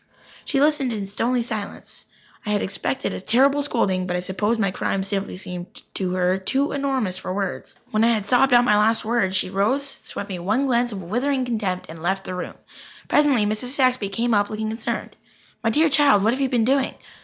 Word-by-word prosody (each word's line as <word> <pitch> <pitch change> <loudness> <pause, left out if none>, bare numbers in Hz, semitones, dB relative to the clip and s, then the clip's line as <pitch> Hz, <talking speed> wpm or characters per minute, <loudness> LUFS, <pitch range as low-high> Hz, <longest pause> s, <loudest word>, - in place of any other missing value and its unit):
She 275 - 0
listened 290 -3 +2
in 205 -2 -3
stony 235 +5 -1
silence. 220 -3 -7 0.4
I 210 - -5
had 210 -1 +1
expected 200 +6 -2
a - - -5
terrible 270 +8 +3
scolding, 190 -9 0
but 180 - -2
I - - -2
suppose 205 +5 -1
my 200 -4 +1
crimes 190 +1 -2
simply 195 -2 -3
seemed 180 -1 -7
to 185 -2 -2
her 185 +1 +1
too 270 +9 0
enormous 265 -10 -1
for - - -5
words. 195 -2 -4 0.2
When 215 0 +2
I 230 0 +4
had 210 -2 -3
sobbed 260 +4 +3
out 240 0 +6
my 210 -4 +4
last 215 +2 +3
word 215 -5 +1
she 185 -1 0
rose, 260 +9 0
swept 200 - -7
me 185 -2 -4
one 215 +10 0
glance 240 -2 +1
of 195 -3 -6
withering 255 +8 0
contempt, 210 -7 -2
and 160 0 -10
left 190 +3 -1
the - - -5
room. 180 - -5 0.5
Presently 285 -7 +3
Mrs. 215 +5 -2
Saxby 255 -7 +2
came 230 +4 0
up, 205 -1 +2
looking 215 0 -3
concerned. 225 +2 -4 0.5
"My 225 - +2
dear 310 +8 +3
child, 280 -9 +4
what 220 +3 +3
have 265 - -3
you 270 - +1
been 235 -3 +2
doing? 270 +1 +1
220 Hz, 210 wpm, -23 LUFS, 195-255 Hz, 0.5 s, out